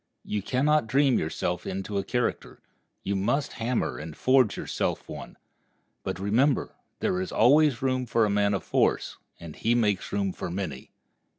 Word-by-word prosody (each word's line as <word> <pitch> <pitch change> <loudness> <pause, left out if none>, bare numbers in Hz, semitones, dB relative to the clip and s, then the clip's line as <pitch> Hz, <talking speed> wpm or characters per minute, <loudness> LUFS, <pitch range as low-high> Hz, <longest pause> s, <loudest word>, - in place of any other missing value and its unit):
You 105 - -2
can 130 +7 0
not 150 -5 +3
dream 135 0 +3
yourself 85 +2 -2
into 95 +1 -3
a - - -2
character; 125 +4 -2 0.4
you 100 - -1
must 135 +9 0
hammer 120 -6 -1
and 75 0 -8
forge 130 -5 +3
yourself - - -2
one. - - -9 0.6
But - - -4
remember, 120 +8 +1 0.3
there 90 - 0
is 95 - -4
always 135 +1 +4
room 130 -1 0
for 115 -1 +3
a - - 0
man 100 0 +2
of 95 - -3
force, - - +1 0.2
and 85 -3 -9
he 115 +2 +1
makes 105 -5 +1
room 100 -2 -1
for - - -5
many. 85 -7 -5
105 Hz, 170 wpm, -27 LUFS, 95-130 Hz, 0.6 s, always